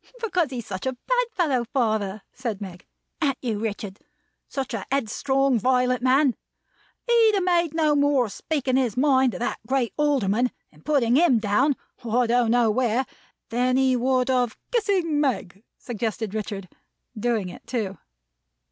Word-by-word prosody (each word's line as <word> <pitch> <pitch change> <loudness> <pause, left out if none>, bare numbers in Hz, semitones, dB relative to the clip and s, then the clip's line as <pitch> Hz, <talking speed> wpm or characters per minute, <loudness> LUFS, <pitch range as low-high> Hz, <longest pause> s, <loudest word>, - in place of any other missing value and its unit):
"Because 365 - 0
he's 245 -4 -5
such 190 +5 -5
a 260 - 0
bad - - 0
fellow, 280 -9 +1
father," 220 -5 -1
said 230 -6 -4
Meg. 185 -3 -9 0.3
"An't 275 -4 +1
you, 225 -5 -2
Richard? 205 -2 -4 0.5
Such 270 -3 -4
a 215 -4 -3
headstrong, 270 0 +1
violent 250 +1 +2
man! 260 +1 +3 0.7
He'd 460 -2 +5
have 390 - +1
made 340 -3 +1
no 310 -2 +3
more 285 -3 +3
of 210 - -7
speaking 265 +3 -1
his 250 -3 0
mind 260 -3 +3
to - - -5
that 240 - -2
great 260 -2 0
Alderman, 250 -6 +2 0.2
and 150 0 -22
putting 260 -5 +2
him 315 -7 +5
down 225 +7 +2 0.3
I 240 +2 +1
don't 235 0 +2
know 235 -1 +3
where, 245 +2 +1 0.5
than 250 +2 +2
he 265 -1 +3
would 255 +1 +1
of 245 -3 0
" - - -53
" - - -48
Kissing 385 -10 +1
Meg," 205 -9 -2 0.2
suggested 220 -3 -4
Richard. 205 -3 -4 0.5
Doing 220 -3 -1
it, - - -12
too. 210 -6 -3
250 Hz, 165 wpm, -24 LUFS, 220-280 Hz, 0.7 s, He'd